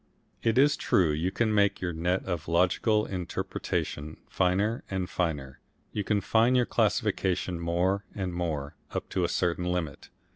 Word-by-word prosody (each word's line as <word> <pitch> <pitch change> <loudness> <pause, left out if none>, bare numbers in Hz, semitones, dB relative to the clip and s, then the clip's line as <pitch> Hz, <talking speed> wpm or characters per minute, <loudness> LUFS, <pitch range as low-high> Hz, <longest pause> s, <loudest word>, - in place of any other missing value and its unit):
It 115 0 +1
is 145 +2 +5
true 85 -5 +3
you 80 +5 0
can 110 +3 0
make 100 -1 +3
your 90 -2 -2
net 90 +3 0
of 85 -5 -3
logical 90 +6 +2
interpretation 85 -4 -3
finer 100 +5 +1
and 95 -2 -2
finer, 75 -8 -2 0.3
you 105 - -2
can 100 +1 +1
fine 115 +5 +3
your 125 -1 +4
classification 90 -5 0
more 90 +4 +1
and 95 -3 -3
more 80 -5 -2 0.2
up - - -4
to 95 - 0
a 85 - +1
certain 90 0 0
limit. 90 -5 -3
90 Hz, 155 wpm, -28 LUFS, 85-100 Hz, 0.3 s, is